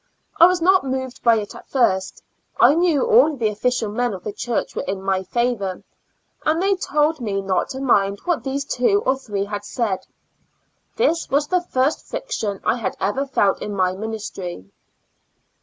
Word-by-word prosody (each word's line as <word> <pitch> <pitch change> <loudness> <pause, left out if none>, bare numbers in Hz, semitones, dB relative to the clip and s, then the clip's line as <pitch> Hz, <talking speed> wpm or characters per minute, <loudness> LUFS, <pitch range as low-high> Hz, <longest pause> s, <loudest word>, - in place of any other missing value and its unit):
I 340 - +10
was 360 -2 0
not 375 +1 +5
moved 260 -1 -4
by 235 -1 +5
it 210 -2 -3
at - - -13
first; 190 -8 0 0.4
I - - +7
knew 335 -3 +2
all 450 -10 +5
the 230 -5 0
official 220 +1 -1
men 240 -1 -1
of 180 - -10
the 210 - -4
church 235 +2 -3
were - - -1
in 195 0 -3
my 190 -1 0
favor, 200 -2 -2 0.6
and 315 +1 +1
they 390 +2 +2
told 305 -4 0
me 200 -4 -1
not 195 -1 -1
to 265 -1 -5
mind 200 -7 +2
what, 350 -3 0
these 275 +1 -2
two 400 +12 +1
or 260 - +3
three 205 -7 -4
had 205 0 -5
said. 210 -3 -2 0.9
This 395 -8 +1
was 285 +2 +2
the 360 +2 +1
first 280 -4 -1
friction - - -4
I - - +1
had 230 - -3
ever 265 +9 -1
felt 205 -7 +1
in 205 - -4
my 185 -1 +1
ministry. 190 - -6
245 Hz, 180 wpm, -21 LUFS, 200-300 Hz, 0.9 s, I